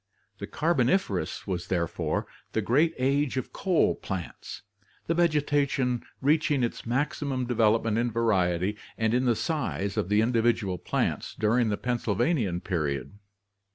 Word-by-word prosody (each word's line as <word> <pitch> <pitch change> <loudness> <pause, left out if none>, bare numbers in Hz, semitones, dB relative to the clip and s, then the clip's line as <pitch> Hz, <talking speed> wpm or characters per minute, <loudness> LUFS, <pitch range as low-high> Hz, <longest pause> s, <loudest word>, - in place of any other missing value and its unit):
The - - -5
Carboniferous 170 +4 0
was 90 -2 -3
therefore 85 -4 -1 0.3
the 110 - +1
great 150 +10 +2
age 135 +1 +1
of 130 - -4
coal 185 -4 +2
plants, 95 -4 -6 0.4
the 165 - +1
vegetation 145 -6 +1 0.2
reaching 145 -1 +2
its 115 - -3
maximum 135 +1 -1
development 115 -2 +2
in 120 +1 +1
variety 100 -4 +1 0.2
and 110 0 +1
in 125 +1 +2
the 120 -2 +3
size 115 -5 -2
of 90 - 0
the 105 +1 +4
individual 115 -5 +1
plants - - -2
during 115 +2 +2
the 105 - 0
Pennsylvanian 115 - 0
period. 75 -1 -3
120 Hz, 130 wpm, -27 LUFS, 100-140 Hz, 0.4 s, the